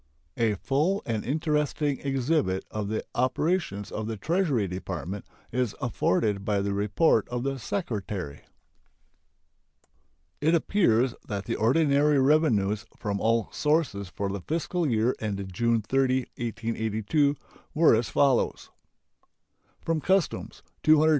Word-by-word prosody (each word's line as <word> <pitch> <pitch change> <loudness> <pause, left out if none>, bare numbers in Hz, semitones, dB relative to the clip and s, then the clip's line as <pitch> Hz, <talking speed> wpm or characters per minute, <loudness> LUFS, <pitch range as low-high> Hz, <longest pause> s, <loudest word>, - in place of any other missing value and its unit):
A 110 -3 +1
full 150 - 0
and 110 -3 -2
interesting 150 0 0
exhibit 135 -7 0
of 105 -2 -3
the 110 +1 -3
operations 130 - 0
of 110 0 -4
the 110 -1 -4
Treasury 150 - +1
Department 90 +1 -5 0.2
is 125 -2 -1
afforded 105 -5 0
by 100 0 +1
the 100 0 -1
report 105 +4 +2
of 120 0 -3
the 135 0 -2
Secretary. 105 - -4 2.0
It 160 +3 +4
appears 130 - +2
that 100 -2 -4
the - - -2
ordinary 145 +4 +3
revenues 120 -8 +3
from 100 -1 -3
all 115 0 +1
sources 150 - 0
for 100 +1 -3
the 100 0 -4
fiscal 165 - -1
year 115 +1 +2
ended 100 -3 -4
June 115 +2 +1
30, 130 +3 +2
1882, 115 +4 0 0.4
were 160 +1 +6
as 115 +1 0
follows: 135 -3 +1 1.1
From 165 -2 -1
customs 190 0 0 0.2
$220,410,730. 155 0 +5
120 Hz, 120 wpm, -27 LUFS, 105-150 Hz, 2.0 s, were